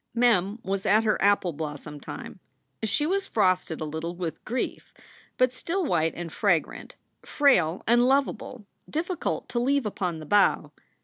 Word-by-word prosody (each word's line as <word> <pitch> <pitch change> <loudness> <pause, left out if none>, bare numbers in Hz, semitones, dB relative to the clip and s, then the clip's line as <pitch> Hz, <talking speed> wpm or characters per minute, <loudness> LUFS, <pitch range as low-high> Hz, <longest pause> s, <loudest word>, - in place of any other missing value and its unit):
Mem 220 -4 +3
was 195 +1 -2
at 215 +2 +4
her 215 -1 +1
apple 200 -3 +3
blossom 150 -1 -6
time. - - -9 0.4
She 220 +7 0
was 390 +4 0
frosted 185 -6 +1
a - - -1
little 160 +3 -4
with 170 -3 -5
grief, 250 +3 -4 0.4
but 255 0 +3
still 345 +8 -2
white 160 - +1
and 170 -2 -6
fragrant, 180 -7 0 0.3
frail 190 - +2
and 240 +2 +4
lov 275 +1 +4
able, 240 -5 -8 0.2
difficult 340 +3 -2
to 240 - -1
leave 275 +1 +1
upon 180 -5 -2
the 155 - -9
bough. 205 +5 +3
205 Hz, 160 wpm, -26 LUFS, 170-255 Hz, 0.4 s, at